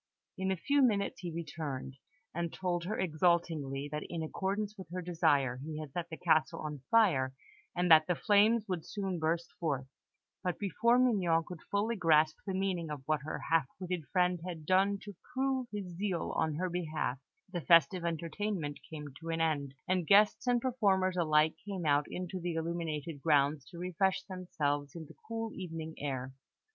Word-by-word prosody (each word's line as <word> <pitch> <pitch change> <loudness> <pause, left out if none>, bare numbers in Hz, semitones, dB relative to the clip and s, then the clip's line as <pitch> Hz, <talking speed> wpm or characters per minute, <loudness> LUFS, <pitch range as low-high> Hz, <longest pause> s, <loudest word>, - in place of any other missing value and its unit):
In 190 0 -2
a 190 - +1
few 285 - +2
minutes 205 -6 +2
he 175 -2 -5
returned, 150 -5 -5 0.4
and 170 -1 -2
told 175 -2 -2
her 215 +4 -2
exultingly 155 -5 +1
that, 150 0 -2
in 165 -2 -3
accordance 200 +5 -2
with 190 -5 -10
her 180 +2 -4
desire, 155 -7 +2
he 155 0 -5
had 155 -3 -7
set 175 -1 -3
the 160 - -6
castle 160 -2 +2
on 150 -3 -5
fire, 150 -13 +4 0.4
and 175 -1 +1
that 155 -1 +8
the 180 - +2
flames 215 +4 +4
would 180 -4 -2
soon 195 -3 -3
burst 165 +2 -1
forth; 140 -6 -1 0.6
but 180 -2 -1
before 230 +5 +2
Mignon 190 -10 +3
could 180 -3 -8
fully 210 +3 +1
grasp 155 -4 +4
the 190 - -1
meaning 185 -4 -1
of 145 -3 -5
what 155 -1 +1
her 150 - -4
half 160 -5 +4
witted 180 -4 -3
friend 180 -1 +2
had 170 -4 -6
done 195 +3 +3
to 205 - -8 0.2
prove 265 -1 0
his 195 -4 -5
zeal 185 -2 -2
on 160 -2 +1
her 185 +4 -1
behalf, 155 -7 -2 0.3
the 175 - -2
festive 170 +1 +5
entertainment 170 -1 -2
came 150 -2 -7
to 165 0 -7
an 165 0 -1
end, 145 -4 0
and 185 -3 +1
guests 210 +4 +5
and 245 -1 +3
performers 195 -7 +2
alike 155 -2 +3
came 195 -4 -4
out 145 0 +3
into 185 +1 -4
the 175 -1 -3
illuminated 160 -2 -3
grounds 145 -2 +3
to 170 - -12
refresh 185 +2 0
themselves 150 -7 -2
in 165 -2 -6
the - - -14
cool 225 -1 -3
evening 165 -3 -6
air. 130 -2 -3
170 Hz, 180 wpm, -32 LUFS, 155-190 Hz, 0.6 s, that